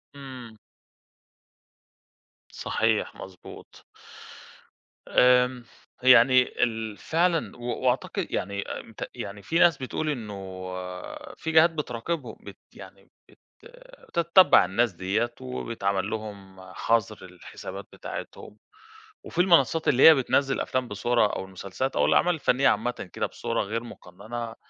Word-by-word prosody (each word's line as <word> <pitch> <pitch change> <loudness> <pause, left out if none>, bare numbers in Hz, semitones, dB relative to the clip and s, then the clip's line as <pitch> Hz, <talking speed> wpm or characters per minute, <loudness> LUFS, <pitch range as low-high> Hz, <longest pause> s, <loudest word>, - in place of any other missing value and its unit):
امم. 130 -5 -10 1.9
صحيح، - - -1
مضبوط. 95 -1 -12 1.2
آمم، 125 0 +3 0.4
يعني 130 0 +5
ال 110 -2 -2
فعلًا، 165 -4 0
و - - -15 0.2
وأعتقد 125 +1 0
يعني 100 +1 -2
آمم - - -8
ت - - -6
يعني 100 +1 -7
في 165 - 0
ناس 170 -4 +5
بتقول 145 +4 -3
إنه 110 -8 -4 1.0
في 160 - -4
جهات 160 +1 +6
بتراقبهم، 150 -1 -4
بت - - -11 0.2
يعني - - -14 0.2
بت - - -22 0.7
بتتّبَع 170 - +5
الناس 105 +4 0
ديّة 105 +7 -1
وبيتعمل 100 -6 -3
لهُم 100 -3 -7
حظر 110 -3 -1
للحسابات 90 -1 -10
بتاعتهم، 105 - -8 0.7
وفي 175 - -1
المنصّات 170 -3 +3
اللي 130 -1 +4
هي 160 - +10
بتنَزِّل 135 0 +1
أفلام 130 -1 -2
بصورة 120 +2 +1
أو - - -4
المسلسلات 95 +8 -5
أو - - +3
الأعمال 180 0 +3
الفنية 135 -2 +2
عامةً 120 -6 -2
كده - - -1
بصورة - - -3
غير 115 +4 -4
مقننة، 115 +3 -8
120 Hz, 115 wpm, -26 LUFS, 105-135 Hz, 1.9 s, هي